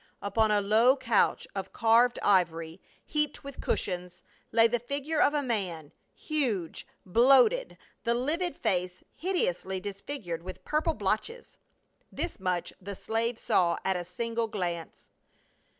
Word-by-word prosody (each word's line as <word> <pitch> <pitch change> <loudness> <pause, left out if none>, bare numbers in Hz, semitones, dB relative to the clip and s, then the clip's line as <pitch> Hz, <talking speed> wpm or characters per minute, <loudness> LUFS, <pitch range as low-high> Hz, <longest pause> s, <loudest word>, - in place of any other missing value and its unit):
Upon 215 +2 +1
a 210 -1 +3
low 225 +6 +4
couch 230 -6 +1
of 195 -1 -5
carved 235 +2 +4
ivor>', 165 -3 +1 0.3
heaped 300 -1 -1
with 280 -1 -8
cushions, 180 -1 -3 0.3
lay 225 0 +5
the 240 +1 0
figure 285 +5 -2
of 290 - +4
a 290 - +1
man, 185 - -3 0.2
huge, 240 - -2 0.2
bloated, 260 - +4 0.3
the 235 -1 +1
livid 325 +8 -1
face 180 -1 -1
hideously 190 - -1
disfigured 195 - -5
with 185 +1 -9
purple 310 +1 0
blotches., 220 - -2 0.6
This - - -4
much 180 -2 -2
the 200 +1 -6
slave 225 +3 -2
saw 170 -5 +2
at 190 - +2
a 180 - -2
single 230 +6 -3
glance. 175 -6 -5
220 Hz, 135 wpm, -29 LUFS, 185-260 Hz, 0.6 s, lay